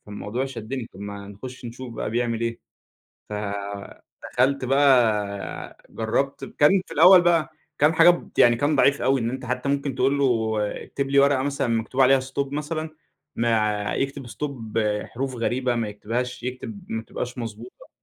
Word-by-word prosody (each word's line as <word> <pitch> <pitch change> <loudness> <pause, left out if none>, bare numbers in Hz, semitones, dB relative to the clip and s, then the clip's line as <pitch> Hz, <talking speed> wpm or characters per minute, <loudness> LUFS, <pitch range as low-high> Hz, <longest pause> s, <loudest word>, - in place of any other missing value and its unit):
فالموضوع 105 +5 -4
شدني. 125 0 -5
طب، 95 - -13
ما 100 0 -7
نخش 125 +5 -10
نشوف 120 +1 -7
بقى 110 - -3
بيعمل 115 -1 -1
إيه، 115 0 -2 0.7
فدخلت 105 +6 -3
بقى 115 -7 +2
جربت 125 +5 -2
ب - - -9
كان 180 +6 +5
في - - -9
الأول 180 +3 +8
بقى 170 -2 +2 0.3
كان 150 +3 +4
حاجات 175 +2 +6 0.2
يعني 120 -1 +6
كان 145 +5 +1
ضعيف 140 0 +3
أوي، 135 -2 +2
إن 115 - -1
أنت 130 0 -5
حتى 125 +2 -2
ممكن 140 -2 -1
تقول 140 +2 +2
له 115 -5 +1 0.3
اكتب 140 -1 -4
لي 140 - +4
ورقة 140 -1 +4
مثلًا 140 -2 -1
مكتوب 115 +3 0
عليها 135 +1 +6
stop 135 +1 -3
مثلًا، 155 +2 -3 0.5
ما 110 -3 +1
يكتب 135 -1 -3
stop 140 +6 -4 0.5
حروف 130 +1 -4
غريبة، 125 +1 0
ما 115 -2 -1
يكتبهاش 120 +4 -4
يكتب 130 - -6
ما 110 0 -3
تبقاش 125 +2 -6
مضبوطة. 115 +1 -8
125 Hz, 160 wpm, -24 LUFS, 115-140 Hz, 0.7 s, الأول